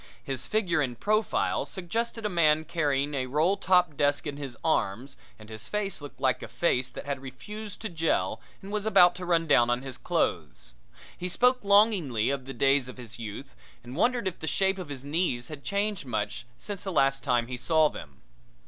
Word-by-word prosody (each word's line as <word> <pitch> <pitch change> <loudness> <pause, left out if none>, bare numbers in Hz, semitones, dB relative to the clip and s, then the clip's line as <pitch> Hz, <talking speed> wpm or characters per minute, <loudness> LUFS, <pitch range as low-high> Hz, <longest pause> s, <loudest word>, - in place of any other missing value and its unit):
His 135 -2 -3
figure 180 -7 +1
in 125 -4 -1
profile 215 - +1
suggested 225 +5 -3
a - - +3
man 160 -4 +3
carrying 145 -3 0
a 130 -2 -1
roll 155 +9 +2
top 180 -5 +3
desk 145 0 +1
in 145 -2 -4
his 135 -4 -6
arms 135 -3 0 0.2
and 110 - -14
his 110 0 -8
face 205 -5 -2
looked 145 - -10
like 130 -2 +1
a - - -6
face 130 -7 0
that - - -8
had 140 -2 -3
refused 205 - -8
to 220 - -3
jell 165 -2 0 0.2
and 195 - -8
was 210 0 -1
about 180 -4 +7
to 185 - -6
run 165 -1 +2
down 120 -6 +4
on 120 +1 0
his 135 -2 -5
clothes. - - -2 0.4
He 180 - -4
spoke 250 +6 +3
longingly 200 - +3
of 135 -2 -3
the 135 - -6
days 135 -1 +3
of 125 - -9
his 120 -2 -9
youth 115 +5 -7 0.3
and 125 +2 -9
wondered 240 - +1
if 185 - -4
the 160 - -5
shape 190 +3 +1
of 175 -5 -7
his 135 -1 -6
knees 145 -5 -1
had 150 -3 -8
changed 200 -6 -1
much 110 +1 -3
since 205 -2 -6
the 190 - -3
last 135 -4 +2
time 125 -4 +2
he 125 +1 -5
saw 155 +5 +3
them. 70 - -10
150 Hz, 200 wpm, -28 LUFS, 130-190 Hz, 0.4 s, about